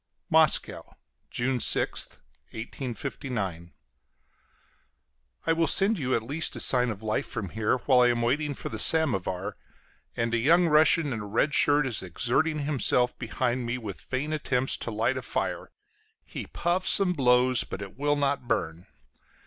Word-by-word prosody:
Moscow, - - +2 0.3
June 125 +1 -1
6th, - - +1 0.4
1859. 115 - -5 1.7
I 165 - +2
will 165 0 +1
send 200 0 +3
you 130 -2 0
at 115 - -1
least 150 +7 -2
a - - -6
sign 125 -1 +3
of 110 -1 -6
life 110 0 -2
from 105 -5 -5
here, 110 +5 0
while 130 -3 +4
I 125 - +5
am 120 -1 0
waiting 145 +4 0
for - - -6
the 110 - -6
samovar; 100 - +1 0.6
and 115 0 -1
a 120 - +2
young 170 +8 +4
Russian 155 -2 +3
in 110 - -4
a - - -7
red 115 +8 0
shirt 145 -1 +3
is 120 -5 -1
exerting 125 - 0
himself 130 -4 +1
behind 125 +1 -2
me 120 +1 -2
with 105 -6 -8
vain 145 +4 -4
attempts 135 -4 0
to - - -5
light 115 +4 -1
a - - -3
fire - - -3 0.6
he - - -7
puffs 180 +4 +2
and 180 -2 +1
blows, 125 -2 +3
but - - -7
it 100 - -11
will 145 +2 0
not 140 -3 -1
burn. 90 -7 -2
125 Hz, 160 wpm, -27 LUFS, 115-145 Hz, 1.7 s, I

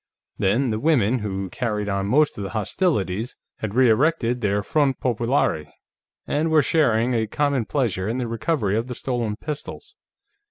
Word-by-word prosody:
Then, 115 +6 +2
the 110 - -1
women, 130 -5 +2
who 95 -2 -3
carried 105 -5 -2
on 100 -1 -1
most 150 +7 +3
of 100 - -5
the 95 - -4
hostilities, 110 - -1 0.2
had 110 -1 -5
re 130 0 +5
erected 125 0 +2
their 100 -1 0
front 140 +3 +1
populaire 115 - 0 0.5
and 155 +3 0
were 155 -2 +4
sharing 125 -6 +2
a 110 -2 0
common 140 0 0
pleasure 105 -9 -1
in 115 - -1
the 125 -2 -2
recovery 115 -2 -1
of 115 +2 -1
the 125 - -5
stolen 120 -5 -2
pistols. 155 - -7
120 Hz, 165 wpm, -23 LUFS, 105-140 Hz, 0.5 s, re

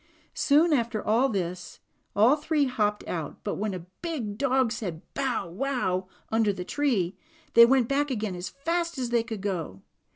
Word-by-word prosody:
Soon 310 +3 +4
after 235 -5 0 0.3
this 180 -3 -4 0.4
all 225 +8 +6
three 300 -1 +1
hopped 210 -5 -1
out, 160 -4 -5
but 205 - -3
when 210 -2 -1
a 175 -2 -7 0.2
big 285 -12 -3
dog 260 -1 +2
said 195 -9 -4
"bow 265 -9 -1
wow," 190 -3 -1 0.2
under 220 -2 +3
the 185 -2 -6
tree, 210 -10 0 0.4
they 235 0 +9
went 255 -2 +3
back 285 +2 +1
again 215 -7 -2
as 180 +1 -5
fast 335 +3 -2
as 250 -2 -2
they 235 -1 +3
could 225 -3 -6
go. 165 - -4
230 Hz, 165 wpm, -27 LUFS, 190-275 Hz, 0.4 s, they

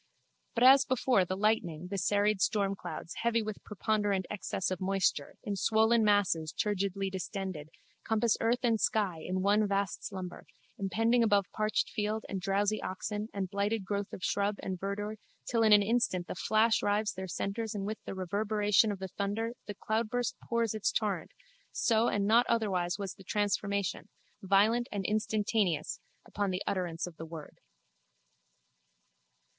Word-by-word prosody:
But 235 - +2
as 270 +1 +8
before 255 -6 +2
the 185 +1 -3
lightning 180 -5 0
the 200 - -1
serried 205 +2 +2
stormclouds, 195 -6 -1
heavy 230 -1 +2
with 215 -1 -6
preponderant 205 -2 0
excess 190 -2 -2
of 185 - -3
moisture, 190 -6 0
in 205 - -2
swollen 220 +4 +3
masses 195 -7 +2
turgidly 195 -1 -1
distended, 190 -5 -5 0.3
compass 225 0 +2
earth 235 +2 +1
and 230 -3 +2
sky 200 -8 +1
in 185 0 -2
one 205 +1 +3
vast 200 0 -1
slumber, 185 -3 -7 0.3
impending 225 +5 +2
above 205 -3 +3
parched 215 -1 0
field 215 0 -2
and 195 -2 -4
drowsy 200 +3 +1
oxen 210 +3 -4
and 190 -3 -4
blighted 200 +1 -1
growth 200 0 -2
of 185 - -8
shrub 200 +1 +1
and 185 -2 -3
verdure 205 +3 -3 0.3
till 230 -2 0
in 220 -1 +5
an 205 -1 +8
instant 225 -5 +1
a - - -2
flash 220 +4 +2
rives 210 +2 +1
their 190 0 -6
centres 215 +5 -3
and 195 -1 -3
with 215 +2 -4
the - - -6
reverberation 205 +3 +2
of 200 - -4
the 190 0 -6
thunder 210 +5 -2
the 205 - -5
cloudburst 225 +3 -1
pours 235 -2 +1
its 215 -2 0
torrent, 200 -7 -1 0.4
so 225 0 +2
and 205 -1 +1
not 230 +4 +4
otherwise 185 -6 0
was 195 -2 -4
the 195 - -15
transformation, 200 -1 -1 0.3
violent 210 +5 +3
and 200 -2 -3
instantaneous, 210 -5 0 0.3
upon 205 -1 -2
the 185 +1 -2
utterance 175 -4 -2
of 175 -3 -10
the 165 - -6
word. 160 -2 -10
205 Hz, 160 wpm, -31 LUFS, 190-220 Hz, 0.4 s, as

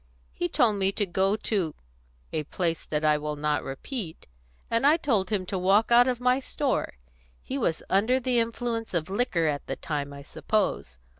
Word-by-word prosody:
He 175 - -2
told 215 -4 +3
me 195 0 +2
to 205 - 0
go 195 +2 +1
to 195 -7 -1 0.6
a 155 - 0
place 165 0 -2
that 150 0 -1
I 150 -1 +4
will 150 0 -3
not 150 0 0
repeat, 165 - -5 0.4
and 230 +4 +2
I 305 +3 +6
told 220 - +1
him 200 -4 0
to 190 +1 -3
walk 200 +5 +3
out 240 +1 +7
of 250 -2 0
my 250 +1 +3
store. 270 - -2 0.4
He 275 - -4
was 165 -9 0
under 220 +7 +3
the 250 -1 +1
influence 230 -2 -2
of 170 +2 -1
liquor 195 -6 +1
at 145 -2 -1
the - - -2
time, 145 -2 -4
I 140 0 -9
suppose. 170 - -1
195 Hz, 190 wpm, -27 LUFS, 160-240 Hz, 0.6 s, out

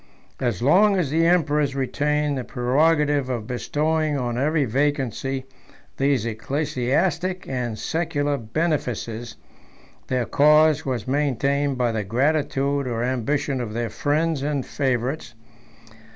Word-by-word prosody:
As 120 -5 -1
long 195 +8 +5
as 160 -7 0
the 165 +2 +3
emperors 150 -5 +2
retained 145 +2 0
the 130 - -3
prerogative 145 +2 +1
of 120 -4 -3
bestowing 150 +5 -1
on 120 -3 -2
every 145 +3 +1
vacancy 135 0 -1 0.5
these 135 -4 +1
ecclesiastic 145 - -1
and 125 -4 -3
secular 145 -1 -1
benefices, 120 -3 -2 0.7
their 125 -2 0
cause 150 +1 +4
was 125 -4 -2
maintained 140 0 0
by 120 -2 +1
the 110 -2 -2
gratitude 140 +4 0
or 115 -1 -2
ambition 130 +2 -1
of 110 -3 -5
their 115 0 -2
friends 155 0 0
and 145 -2 -1
favorites. 130 -2 -2
140 Hz, 120 wpm, -23 LUFS, 125-150 Hz, 0.7 s, long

